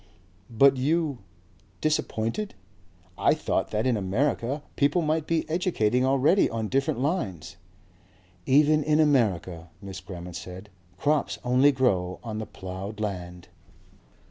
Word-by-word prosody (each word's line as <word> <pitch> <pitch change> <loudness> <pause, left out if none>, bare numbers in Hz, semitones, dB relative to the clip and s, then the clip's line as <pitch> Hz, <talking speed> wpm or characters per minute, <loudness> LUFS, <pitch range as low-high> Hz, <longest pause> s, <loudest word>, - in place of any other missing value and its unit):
"But 135 +4 +5
you? 150 0 0 0.6
Disappointed? 155 - -1 0.6
I - - +4
thought - - -1
that 110 +2 -1
in 130 -2 +2
America 120 +7 -1
people 145 +5 +2
might 155 0 0
be 165 -1 0
educating 130 - +1
already 140 +8 +3
on 110 -2 -3
different 135 -3 0
lines 130 - -2 0.5
" 90 0 -32
"Even 150 +2 +4
in 155 +1 +2
America," 95 - +1
Miss 95 -2 -8
Grammont 90 -1 -9
said, 95 +3 -9 0.3
"crops 150 +7 0
only 130 +3 +4
grow 95 -9 0
on 110 -2 -4
the 110 - -5
ploughed 95 +3 -7
land." 90 -4 -5
120 Hz, 125 wpm, -26 LUFS, 95-145 Hz, 0.6 s, But